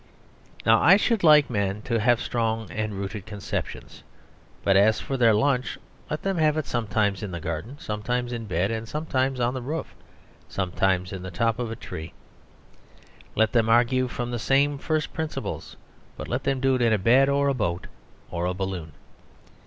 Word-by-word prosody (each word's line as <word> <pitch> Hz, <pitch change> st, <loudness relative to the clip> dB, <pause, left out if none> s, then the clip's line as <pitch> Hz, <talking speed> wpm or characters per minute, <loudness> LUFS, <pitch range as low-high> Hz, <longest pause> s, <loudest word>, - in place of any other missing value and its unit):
Now, 115 Hz, 0 st, +5 dB
I 190 Hz, +3 st, +7 dB
should 220 Hz, -1 st, +1 dB
like 150 Hz, -3 st, +7 dB
men 100 Hz, -2 st, -2 dB
to 115 Hz, -1 st, 0 dB
have 120 Hz, +2 st, +3 dB
strong 115 Hz, -2 st, -2 dB
and 110 Hz, -1 st, -3 dB
rooted 100 Hz, +1 st, -5 dB
conceptions, 105 Hz, -2 st, -5 dB, 0.6 s
but 95 Hz, -, +3 dB
as 105 Hz, +2 st, +5 dB
for 135 Hz, -, -4 dB
their 115 Hz, -4 st, +4 dB
lunch, 130 Hz, +2 st, +1 dB, 0.3 s
let 150 Hz, -, -3 dB
them 195 Hz, -2 st, 0 dB
have 155 Hz, -1 st, +3 dB
it 155 Hz, -, -1 dB
sometimes 105 Hz, -4 st, 0 dB
in 105 Hz, -, -4 dB
the 85 Hz, -1 st, -5 dB
garden, 85 Hz, -, -5 dB
sometimes 120 Hz, +2 st, -3 dB
in 115 Hz, -1 st, -4 dB
bed, 105 Hz, +5 st, -1 dB
sometimes 135 Hz, -2 st, -1 dB
on 120 Hz, 0 st, +1 dB
the 130 Hz, -, -4 dB
roof, 150 Hz, +6 st, -4 dB, 0.6 s
sometimes 95 Hz, 0 st, 0 dB
in 95 Hz, -, -5 dB
the 95 Hz, -, -6 dB
top 115 Hz, +6 st, 0 dB
of 120 Hz, -2 st, -2 dB
a 115 Hz, -, -4 dB
tree. 80 Hz, -6 st, -8 dB, 1.2 s
Let 110 Hz, 0 st, +3 dB
them 115 Hz, -2 st, +2 dB
argue 125 Hz, +2 st, +3 dB
from 120 Hz, 0 st, -4 dB
the 120 Hz, -, -2 dB
same 140 Hz, +4 st, +2 dB
first 155 Hz, 0 st, -1 dB
principles, 160 Hz, -1 st, -5 dB, 0.4 s
but -, -, -6 dB
let -, -, -3 dB
them 135 Hz, -1 st, +1 dB
do 135 Hz, 0 st, +2 dB
it 130 Hz, -, 0 dB
in 115 Hz, -2 st, +4 dB
a -, -, +3 dB
bed, 125 Hz, +7 st, +4 dB
or 140 Hz, 0 st, +2 dB
a 140 Hz, -, +2 dB
boat, 90 Hz, -8 st, -2 dB, 0.5 s
or 85 Hz, +1 st, -1 dB
a 90 Hz, -, -2 dB
balloon. 90 Hz, -5 st, -4 dB
115 Hz, 185 wpm, -25 LUFS, 100-135 Hz, 1.2 s, I